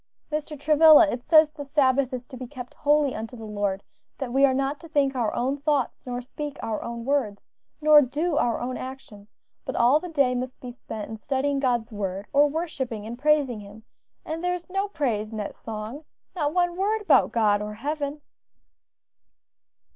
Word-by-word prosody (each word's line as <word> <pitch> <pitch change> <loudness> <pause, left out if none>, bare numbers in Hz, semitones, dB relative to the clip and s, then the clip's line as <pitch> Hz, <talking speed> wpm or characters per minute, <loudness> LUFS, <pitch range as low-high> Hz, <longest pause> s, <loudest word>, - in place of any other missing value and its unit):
"Mr. 300 -1 -4
Travilla, 310 +2 +7
it 240 - -4
says 310 0 +6
the 300 -1 -8
Sabbath 275 -2 +2
is 250 -1 -6
to - - -9
be 255 0 -7
kept 250 -2 -9
holy 290 -2 +2
unto 225 +3 -6
the 225 - -8
Lord; 205 -2 -2 0.3
that 255 -4 -4
we 275 +1 +5
are 260 - +1
not 275 +2 -1
to 335 - -12
think 280 -3 +2
our 235 -4 0
own 265 +4 0
thoughts, 285 -3 -1
nor 245 0 -3
speak 290 +3 -7
our 225 -1 -2
own 235 0 -6
words, 255 -8 -1 0.3
nor 300 -1 +8
do 295 +5 -1
our 235 -5 +1
own 250 +1 -3
actions; 225 -6 -10 0.3
but - - -5
all 245 +5 +4
the 360 - -7
day 280 -6 +2
must 255 +1 -4
be 250 - -7
spent 220 -3 -7
in 220 - -5
studying 275 +4 -1
God's 245 -3 0
word, 195 -1 -4
or 290 +1 +6
worshipping 265 -9 -4
and 235 +2 -7
praising 290 -5 +2
Him; 205 +2 -12 0.4
and 325 +2 -4
there 360 0 +1
is 360 +1 -10
no 390 +1 0
praise 240 - -2
in 220 - -6
that 205 -1 -4
song; 225 +6 -7 0.3
not 295 -4 0
one 350 0 +1
word 420 +4 0
about - - +4
God 210 -3 +2
or 210 0 -5
heaven." 290 +4 -3
265 Hz, 190 wpm, -25 LUFS, 230-300 Hz, 0.4 s, nor